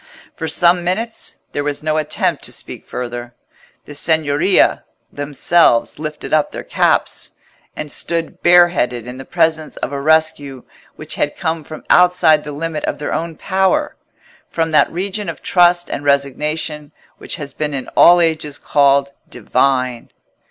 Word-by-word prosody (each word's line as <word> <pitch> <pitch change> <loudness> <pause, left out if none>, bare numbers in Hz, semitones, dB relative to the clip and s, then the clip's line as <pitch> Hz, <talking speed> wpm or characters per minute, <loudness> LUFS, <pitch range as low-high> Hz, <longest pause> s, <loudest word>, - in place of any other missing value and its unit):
For 160 - -4
some 175 +2 +3
minutes 220 +6 -3
there 145 - -2
was 145 0 -3
no 155 0 0
attempt 155 0 -1
to - - -3
speak - - -8
further: 120 -1 -6 0.5
the 145 - -10
Signoria 160 +4 +2 0.3
themselves 145 -1 +2
lifted 155 0 -6
up 155 -1 +2
their - - -7
caps, - - 0 0.4
and 150 -1 -6
stood 165 -1 -3
bare 175 0 +6
headed 125 -8 -2
in 125 +1 -8
the 135 - -8
presence 160 -1 0
of - - -4
a 140 -1 -4
rescue 145 -4 +1 0.3
which - - -5
had - - -1
come 160 0 -2
from 155 +1 -10
outside 180 -4 +4
the 150 - -7
limit 155 +1 -4
of - - -3
their 145 - -4
own 165 0 -3
power—from 190 - -2
that 155 - +4
region 200 +4 -3
of - - -8
trust 175 -1 +3
and 145 - -5
resignation 150 +2 -1 0.3
which - - -4
has 140 -2 -8
been 150 -1 -3
in 130 - -5
all 175 +1 +6
ages 155 -3 -1
called 140 -1 +2 0.2
divine. 125 +1 0
155 Hz, 150 wpm, -17 LUFS, 140-170 Hz, 0.5 s, bare